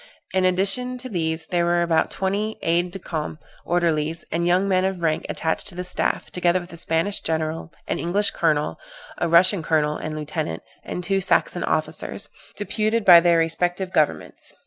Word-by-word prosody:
In 185 -1 +2
addition 195 +8 +1
to 255 +1 -7
these, 160 -4 -2
there 175 -1 +2
were 175 0 +2
about 165 -2 +2
twenty 205 +3 -2
aid 175 +2 +1
de 185 - -7
camps, 155 -4 -5 0.2
orderlies, 165 -2 0
and 170 +2 0
young 180 +3 +3
men 185 -1 +2
of 190 -2 -2
rank 160 0 0
attached 160 0 -1
to 190 - -5
the 180 - -4
staff, 180 - -2
together 180 0 +2
with 175 0 -11
a - - -7
Spanish 165 +5 +1
general, 160 0 -3 0.2
an - - -2
English 200 +5 +1
colonel, 150 - 0 0.4
a - - +1
Russian 180 +3 +5
colonel 150 -1 +1
and 155 0 -5
lieutenant, 150 - -4 0.2
and 180 - -5
two 195 +2 +1
Saxon 200 - +1
officers, - - -3 0.3
deputed 215 +1 -1
by 175 -2 +10
their 170 0 +3
respective 175 +3 0
governments. 155 -1 -1
175 Hz, 175 wpm, -23 LUFS, 160-190 Hz, 0.4 s, by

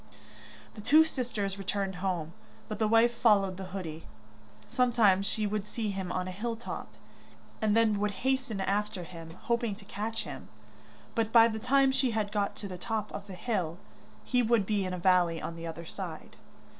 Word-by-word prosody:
The 210 - -9
two 305 +9 +7
sisters 225 -10 -3
returned 195 -1 -2
home, 175 -4 -2 0.3
but 215 -1 -5
the 220 - +3
wife 230 +2 +5
followed 200 -5 +3
the 190 - -5
hoodie. 180 -4 -6 0.6
Sometimes 225 -6 +3
she 215 -2 0
would 210 0 -2
see 215 -1 -2
him 190 -2 -4
on 185 0 -1
a - - -4
hill 230 +5 -3
top, 230 - -7 0.7
and 215 0 +3
then 220 -3 +3
would 210 0 +1 0.2
hasten 265 -5 0
after 200 0 -1
him, 165 -1 -10
hoping 235 -3 0
to 200 0 -15
catch 215 +3 -3
him. - - -8 0.7
But 225 -2 0
by 230 -1 +8
the 220 -1 -3
time 270 +3 +4
she 265 -1 +2
had 205 -2 0
got 205 -1 0
to 205 - -6
the 180 -2 -7
top 215 +1 -2
of 200 - -7
the 190 - -7
hill, 180 -5 -2 0.5
he 250 -1 +2
would 230 -3 +3
be 205 -1 0
in 185 - -3
the - - -2
valley 175 -2 +3
on 165 - -5
the 165 0 -6
other 165 +1 -6
side. 175 -3 -7
205 Hz, 190 wpm, -30 LUFS, 185-230 Hz, 0.7 s, by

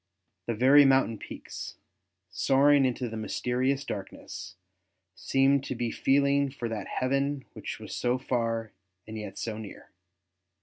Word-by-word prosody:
The 115 - -1
very 135 +6 +7
mountain 135 -5 +3
peaks, - - -8 0.6
soaring 140 +4 +4
into 125 0 -1
the 115 - -6
mysterious 125 +5 -1
darkness, 95 -1 -7 0.6
seemed 135 +7 +2
to 130 - -3
be 120 -1 -2
feeling 140 +2 +2
for 130 -3 -5
that 110 -3 -4
heaven 135 +1 -1
which - - -6
was - - -8
so 125 +1 +1
far 115 -3 -1 0.3
and 110 - -8
yet 105 -3 -7
so 110 -2 -4
near. 105 -2 -10
130 Hz, 135 wpm, -28 LUFS, 115-135 Hz, 0.6 s, very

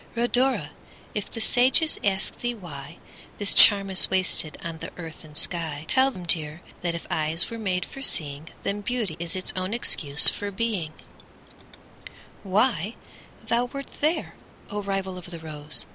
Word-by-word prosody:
Rhodora! 240 - +2 0.4
if 210 - -4
the 225 - -6
sages 260 +7 +3
ask 195 0 -1
thee 240 0 -2
whyThis 175 +3 -5
charm 200 -2 +7
is 190 - +6
wasted 185 -4 0
on 165 -2 -6
the - - -6
earth 165 -2 -9
and 150 -1 -6
sky, 160 -3 0
Tell 265 +1 +4
them, 185 -9 -9
dear, 160 0 +1 0.2
that 170 -1 -2
if 170 - -7
eyes 160 +4 -1
were 230 - -6
made 185 -4 -1
for 270 - -11
seeing, 150 - 0
Then 200 +1 -2
Beauty 220 -7 -2
is 170 +1 -2
its 185 - -1
own 185 +4 -2
excuse 150 -10 +4
for 205 - +1
being:Why 200 +1 -5 0.5
thou 235 +2 +1
wert 275 +3 -9
there, 310 +3 0 0.4
O 205 0 -3
rival 195 -2 -3
of 175 - -12
the 170 - -8
rose! 150 -2 -2
190 Hz, 155 wpm, -25 LUFS, 160-230 Hz, 0.5 s, charm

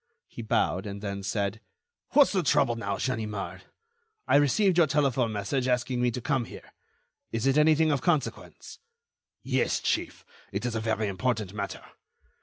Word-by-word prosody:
He - - -9
bowed, 95 -4 0
and 100 0 -6
then 100 -1 -4
said: 100 +1 -2 0.5
"What's 285 0 +6
the 190 - +1
trouble 145 -6 +2
now, 100 -3 -3
Ganimard? 110 -5 -4 0.6
I - - +5
received 175 +6 +3
your 165 - +5
telephone 135 -5 +1
message 110 +6 -1
asking 125 0 0
me 125 - +3
to 120 - -4
come 130 -1 0
here. - - -12 0.6
Is 115 +2 -2
it 135 0 +3
anything 155 +1 +4
of 140 - 0
consequence?" 160 -6 -2 0.6
"Yes, - - +1
chief, - - -2 0.3
it - - -3
is 120 - -1
a 115 - -1
very 110 -1 0
important 105 0 -2
matter. 100 -1 -5
120 Hz, 160 wpm, -27 LUFS, 105-145 Hz, 0.6 s, What's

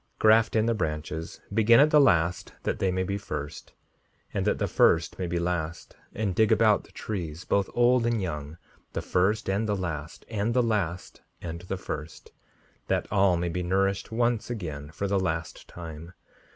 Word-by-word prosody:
5:63 - - -42
Graft 110 +1 +5
in 110 0 +3
the 115 - +2
branches; 80 -3 -4
begin 115 +2 +6
at 150 +2 +5
the 150 - +7
last 90 -9 +2
that - - -2
they 95 - +2
may 95 0 0
be 100 +2 -2
first, 75 -6 -6 0.6
and - - -1
that - - +2
the - - 0
first 80 +3 +3
may 90 - -1
be 85 0 -1
last, 85 -1 -3 0.2
and 105 -4 -1
dig 110 +4 +3
about 110 -1 +4
the - - -19
trees, 85 -6 -5
both 100 -1 +1
old 120 0 +4
and 120 -1 +1
young, 75 -4 -4 0.4
the - - -2
first 105 +4 +1
and 100 +3 0
the 105 - +2
last; 80 -5 -5
and 110 +1 -1
the 125 - +4
last 95 -6 -2 0.2
and 85 0 -6
the 95 - -2
first, 80 -3 -7 0.6
that - - 0
all 95 -3 +4
may 85 0 -1
be 90 +2 -2
nourished 95 +3 0
once 120 0 0
again 80 -11 -5
for 100 +5 -3
the 100 0 +1
last 80 -3 -3
time. 85 0 -9
95 Hz, 190 wpm, -27 LUFS, 85-110 Hz, 0.6 s, the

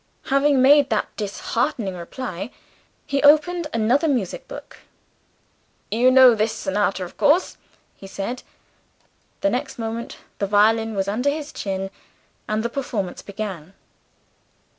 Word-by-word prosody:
Having 275 -1 +4
made 285 +1 +6
that 215 - -1
disheartening 205 -1 -2
reply, 180 +3 -6 0.6
he 280 0 -1
opened 310 +3 +4
another 240 +7 +2
music 245 - -2
book. - - -10 1.1
"You 240 +4 +4
know 255 -1 +8
this 215 0 0
sonata, 200 -2 -1
of 175 - -10
course?" 305 +6 +2 0.4
he 195 - -11
said. 200 +6 -5 1.0
The 295 - +2
next 270 +3 -3
moment, 230 0 -5 0.2
the 200 - 0
violin 220 +2 +3
was 195 0 -1
under 240 +8 0
his 300 0 -4
chin 195 -1 -4 0.6
and 215 +1 0
the - - +1
performance 230 -8 -4
began. 195 -4 -7
225 Hz, 125 wpm, -22 LUFS, 200-275 Hz, 1.1 s, know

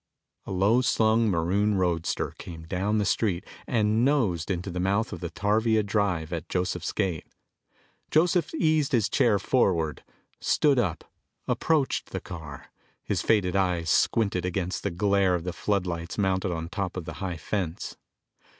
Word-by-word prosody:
A - - -5
low 100 +6 +3
slung 115 -3 +3
maroon 100 +4 +1
roadster 85 -3 0
came 80 -2 -8
down 95 +6 -1
the 105 - +1
street 95 -3 0 0.2
and 110 -1 +2
nosed 110 - +1
into 90 0 -2
the 90 - -4
mouth 100 +5 0
of - - -6
the 85 - -4
tarvia 110 +4 +1
drive 100 -6 0
at 80 -2 -5
Joseph's 90 -1 -1
gate. 95 -7 -2 0.8
Joseph 170 +2 +2
eased 155 - +2
his 110 -4 +3
chair 110 -4 +3
forward, 90 - +1 0.4
stood 145 -4 +3
up, 95 -9 -1 0.4
approached 155 -5 +1
the - - -4
car, 80 -5 -9 0.3
his - - -1
faded 100 -4 +2
eyes 90 -5 +1
squinted 100 - +2
against 90 0 -2
the 100 - -1
glare 100 0 +2
of 85 - -3
the 90 0 -3
floodlights 90 -3 -2
mounted 95 -2 +1
on 80 -1 -3
top 95 +1 -4
of 90 - -5
the 80 - -6
high 90 -3 -3
fence. 85 0 -3
95 Hz, 155 wpm, -27 LUFS, 85-110 Hz, 0.8 s, low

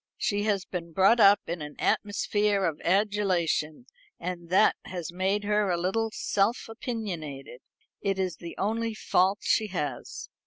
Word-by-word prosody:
She 205 -1 0
has 200 -3 0
been 170 -2 -6
brought 195 +7 +5
up 200 -1 +7
in 170 -1 -4
an 150 0 -7
atmosphere 205 -1 +1
of 155 -2 -2
adulation, 190 -3 +1 0.3
and 175 -1 -5
that 190 +4 +5
has 175 -3 -5
made 190 +3 0
her 210 -1 +1
a 175 - +1
little 225 +6 0
self 210 +2 0
opinionated. 175 - -6 0.4
It 195 -1 0
is 185 -3 -2
the 170 -1 -8
only 225 +2 -1
fault 195 -1 +2
she 220 -4 +2
has." 150 -10 -4
195 Hz, 150 wpm, -27 LUFS, 170-210 Hz, 0.4 s, up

